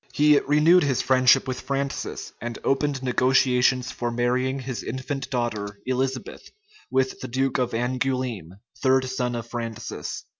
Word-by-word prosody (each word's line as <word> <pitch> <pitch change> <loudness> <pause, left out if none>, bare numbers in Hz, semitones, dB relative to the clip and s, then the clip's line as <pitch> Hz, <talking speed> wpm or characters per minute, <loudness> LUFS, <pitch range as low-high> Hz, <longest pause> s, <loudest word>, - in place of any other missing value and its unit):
He 150 -1 +5
renewed 150 +5 +4
his 135 -4 +1
friendship 130 0 +4
with 130 -1 -3
Francis, 140 0 -3
and 120 +1 -4
opened 135 -1 0
negotiations 125 0 +2
for 120 -1 -3
marrying 125 +3 0
his 130 -2 -5
infant 130 +3 -4
daughter, 105 -5 -3
Elizabeth, 130 +1 -3 0.4
with 130 0 0
the - - -6
duke 130 +2 0
of 125 -1 +1
Angoulême, 125 -6 -2 0.3
third 130 -1 +3
son 125 -1 -2
of 115 -1 -4
Francis. 115 -2 -5
130 Hz, 140 wpm, -24 LUFS, 120-135 Hz, 0.4 s, He